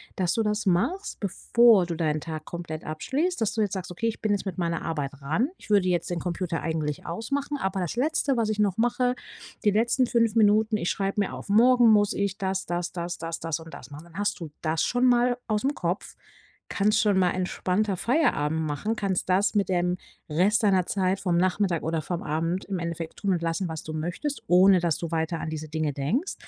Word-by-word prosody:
dass 180 -3 0
du 225 - +1
das 210 0 -1
machst, 245 - 0
bevor 210 -1 +4
du 170 - -3
deinen 155 -2 0
Tag 155 -1 -6
komplett 170 -2 -6
abschließt 280 - -2
dass 220 - +1
du 220 - +1
jetzt 205 -1 0
sagst: 185 -2 -4
„Okay, 225 +6 -2
ich 225 - -7
bin 215 - 0
jetzt 205 0 0
mit 185 -2 -4
meiner 170 -1 -1
Arbeit 145 -4 -3
ran. 210 - 0
Ich - - -11
würde 200 -3 +4
jetzt 175 -1 0
den 175 - -1
Computer 175 -1 -3
eigentlich 155 -3 -3
ausmachen, 275 - -3
aber 190 -6 -2
das 180 +1 -3
Letzte, 275 0 +1
was 220 -2 +1
ich 215 -1 -2
noch 200 -3 +2
mache 245 +2 +1 0.5
die 210 - +5
letzten 235 +5 +2
5 230 -2 +1
Minuten 215 0 +4
ich 175 - -1
schreibe 195 +1 -2
mir 200 - -2
auf: - - -9
‚Morgen 240 +2 +6
muss 205 -1 +4
ich 200 -1 -1
das, 190 0 -2
das, 175 0 -2
das, 175 -1 -4
das, 165 0 -5
das 165 0 -2
und 160 0 -12
das 130 - -10
machen.'” 145 +2 -9
Dann 170 0 -14
hast 205 0 -1
du 165 -3 -6
das 160 0 0
schon 245 +1 +1
mal 245 0 +3
aus'm 220 +7 0
Kopf, 175 -2 -2 0.7
kannst 210 +2 +2
schon 205 -3 +2
mal 180 -1 +4
entspannter 185 +2 -1
Feierabend 160 - +1
machen, 160 +9 -2
kannst 195 -4 -2
das 190 +3 +2
mit 200 -3 +1
dem 180 0 +1 0.3
Rest 190 +8 +2
deiner 190 -4 +3
Zeit 190 -1 0
vom 175 -3 0
Nachmittag 185 -1 +1
oder 160 0 -1
vom 175 +2 -4
Abend 165 +5 -1
im 195 -3 -3
Endeffekt 170 -1 -5
tun 200 - -1
und 175 - -1
lassen, 165 +3 -1
was 160 -1 -5
du 155 - -6
möchtest, 175 - -3
ohne 185 +1 +6
dass 170 -3 0
du 170 -1 -5
weiter 160 0 -1
an 160 - -4
diese 155 0 -5
Dinge 155 -1 -1
denkst. 170 - -1
185 Hz, 220 wpm, -26 LUFS, 165-215 Hz, 0.7 s, Morgen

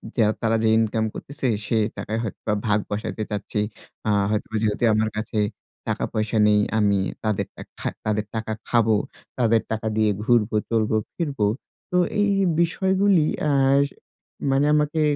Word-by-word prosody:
যে 115 - +4 0.2
তারা 115 -1 +2
যে 110 - +4
ইনকাম 110 0 +1
করতেছে 140 -1 -4 0.2
সে 115 - +1 0.2
টাকায় 110 +1 -3
হয়তোবা 105 -1 -3
ভাগ 105 0 +3
বসাতে 105 +1 -3
চাচ্ছি। 105 0 -2 0.5
আ - - +2 0.2
হয়তোবা 110 +1 -2
যেহেতু 110 +1 0
আমার 110 0 +2
কাছে 110 0 -2 0.5
টাকা-পয়সা 110 +1 -1
নেই, 105 0 +4 0.2
আমি 100 -2 +3 0.2
তাদেরটা 110 -2 -2 0.2
খা - - -1 0.2
তাদের 105 0 0
টাকা 110 0 -2
খাবো, 115 -2 +3 0.4
তাদের 115 -2 +3
টাকা 110 0 -2
দিয়ে 110 -1 +3
ঘুরবো, 110 -2 +2
চলবো, 110 -1 +1 0.2
ফিরবো। 140 -10 -1 0.5
তো 180 - +2 0.2
এ - - +4
এই 205 - +2 0.3
বিষয়গুলি 190 0 +3 0.2
অ্যাস 140 -1 +4 0.7
মানে 135 +2 +3
আমাকে 150 +1 +2
110 Hz, 145 wpm, -23 LUFS, 110-135 Hz, 0.7 s, যে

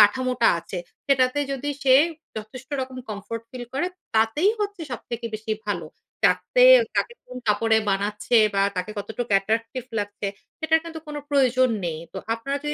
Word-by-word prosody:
কাঠামোটা 250 +3 +4
আছে 180 - -6 0.3
সেটাতে 260 -1 +3
যদি 275 +2 -2
সে 260 -1 +6 0.4
যথেষ্ট 220 +4 -8
রকম 260 0 -5
কমফোর্ট 215 +2 -5
ফিল 250 -1 -6
করে 295 +6 +1 0.3
তাতেই 225 - +3
হচ্ছে 410 -2 -2
সবথেকে 235 -1 -5
বেশি 220 0 -3
ভালো। 200 -5 -2 0.4
যাতে - - +3 0.3
কাকে 475 - 0
কোন 250 0 -9
কাপড়ে 220 +1 +3
বানাচ্ছে 205 +3 0 0.2
বা 195 - +3
তাকে 180 +3 -2
কতটুক 220 +4 -4
অ্যাট্রাকটিভ 225 +5 +1 0.2
লাগছে, 205 0 -3 0.3
সেটার 320 0 +3
কিন্তু 325 -1 -7
কোন 300 0 -6
প্রয়োজন 255 -2 +4
নেই। 160 -2 -2
তো 190 - -5 0.2
আপনাদে 280 +5 -3
240 Hz, 150 wpm, -24 LUFS, 210-275 Hz, 0.4 s, সে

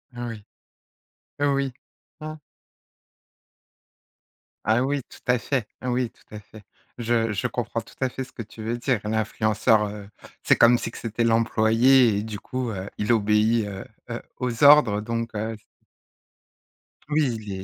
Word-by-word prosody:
Ah 120 0 -4
oui, 110 -3 -7 1.0
oui. 140 -2 +1 0.5
Mmh. 155 0 -6 2.3
Ah 110 +3 +3
oui, 140 +1 0
tout - - -14
à 125 0 +4
fait. 125 -2 -2 0.2
Oui, 125 -1 0
tout 105 - -16
à - - -6
fait. 105 0 -15 0.3
Je 115 -2 0
je 95 - -1
comprends - - -3
tout - - -17
à 130 - +1
fait 130 +1 -5
ce 130 - -14
que 115 - -7
tu 110 +1 -11
veux 115 +2 -2
dire. 120 -3 0
L'influenceur, 110 0 +1
heu, 100 -1 -8 0.4
c'est - - +5
comme 120 +1 +6
si - - -4
que - - -11
c'était 115 0 -2
l'employé 115 +1 +4
et - - -3
du 110 -2 -6
coup, 130 -2 -4
heu, 95 0 -5
il 105 +3 0
obéit, 110 +1 +3
heu, 95 -1 -6 0.3
heu, 120 - -4 0.2
aux 125 +1 -2
ordres 140 -8 +7
heu, - - -5
donc 115 0 -4
heu 110 +1 -3 1.5
Oui, 150 -6 +1
il 105 -2 -8
est 95 0 -6
115 Hz, 165 wpm, -24 LUFS, 110-125 Hz, 2.3 s, ordres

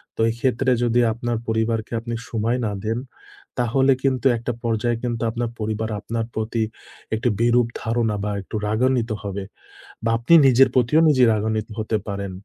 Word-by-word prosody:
তো - - -2
এই - - -1
ক্ষেত্রে 130 0 +1
যদি 120 0 +2
আপনার 120 0 -2
পরিবারকে 110 0 -1
আপনি 115 0 -5
সময় 115 +2 0
না 105 - -1
দেন, 110 +1 0 0.6
তাহলে 130 +3 +3
কিন্তু 130 -1 0
একটা 120 +2 -3
পর্যায়ে 115 0 0
কিন্তু 120 -2 -2
আপনার 120 0 -2
পরিবার 110 +1 -2
আপনার 115 +1 -3
প্রতি 110 +1 -1 0.5
একটি 120 +3 0
বিরূপ 120 0 +3
ধারণা 115 -2 0
বা 105 - -1
একটু 95 - -9
রাগান্বিত 120 +1 +1
হবে। 100 -1 -4 0.6
বা 115 - +1
আপনি 120 +8 +2
নিজের 130 +1 +6
প্রতিও 125 +5 +4
নিজেই 130 -5 +5
রাগান্বিত 110 0 -1
হতে 110 0 0
পারেন। 100 -1 -4
115 Hz, 165 wpm, -22 LUFS, 110-120 Hz, 0.6 s, নিজের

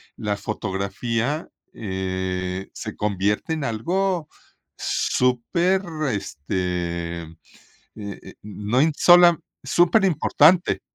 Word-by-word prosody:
la 105 -3 -2
fotografía, 110 - -2 0.3
eh, 95 -1 -3
se - - -7
convierte 105 - -1
en 155 - -3
algo, 170 - -1 0.5
súper, 170 +10 +1 0.3
este, 85 -1 -3
eh, 80 0 -12 0.6
eh, 100 -2 -8
no 105 +4 -2 0.2
sola 175 -1 +7 0.3
superimportante. 175 -2 +3
105 Hz, 75 wpm, -23 LUFS, -, 0.6 s, sola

